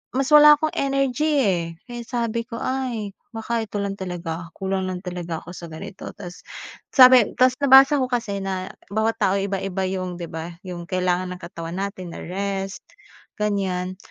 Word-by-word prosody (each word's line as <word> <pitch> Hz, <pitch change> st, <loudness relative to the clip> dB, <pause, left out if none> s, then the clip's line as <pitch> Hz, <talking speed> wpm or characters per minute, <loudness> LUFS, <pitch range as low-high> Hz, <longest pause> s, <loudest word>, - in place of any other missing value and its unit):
mas 270 Hz, +1 st, +1 dB
wala 300 Hz, 0 st, +9 dB
akong 310 Hz, +1 st, -1 dB
energy, 275 Hz, +2 st, +1 dB
eh. 185 Hz, -7 st, +2 dB, 0.2 s
Kaya 240 Hz, -1 st, -7 dB
sabi 235 Hz, -1 st, -2 dB
ko, 230 Hz, 0 st, -8 dB
"Ay, 245 Hz, -6 st, -3 dB, 0.2 s
baka 230 Hz, 0 st, -2 dB
ito 210 Hz, -1 st, -5 dB
lang 200 Hz, -1 st, -2 dB
talaga. 175 Hz, -3 st, -5 dB
Kulang 190 Hz, -1 st, -2 dB
lang 185 Hz, +1 st, -6 dB
talaga 175 Hz, -2 st, -4 dB
ako 175 Hz, -, -10 dB
sa 170 Hz, -2 st, -9 dB
ganito." 195 Hz, +5 st, -8 dB
Tas 175 Hz, 0 st, -9 dB, 0.5 s
sabi 255 Hz, -4 st, +8 dB
tas 255 Hz, 0 st, +5 dB
nabasa 270 Hz, +1 st, +7 dB
ko 255 Hz, -, -1 dB
kasi 230 Hz, -5 st, -2 dB
na 190 Hz, -1 st, -4 dB, 0.2 s
bawat 220 Hz, +2 st, 0 dB
tao 195 Hz, +1 st, +3 dB
iba-iba 195 Hz, -1 st, -2 dB
‘yong, 185 Hz, -2 st, -3 dB
‘di 175 Hz, -, -5 dB
ba, 165 Hz, +2 st, -6 dB
‘yong 175 Hz, -2 st, -7 dB
kailangan 185 Hz, 0 st, 0 dB
ng -, -, -14 dB
katawan 170 Hz, 0 st, -7 dB
natin 190 Hz, -3 st, -5 dB
na -, -, -7 dB
rest, 195 Hz, +1 st, -3 dB, 0.6 s
ganyan. 190 Hz, -3 st, -1 dB
195 Hz, 170 wpm, -23 LUFS, 180-240 Hz, 0.6 s, wala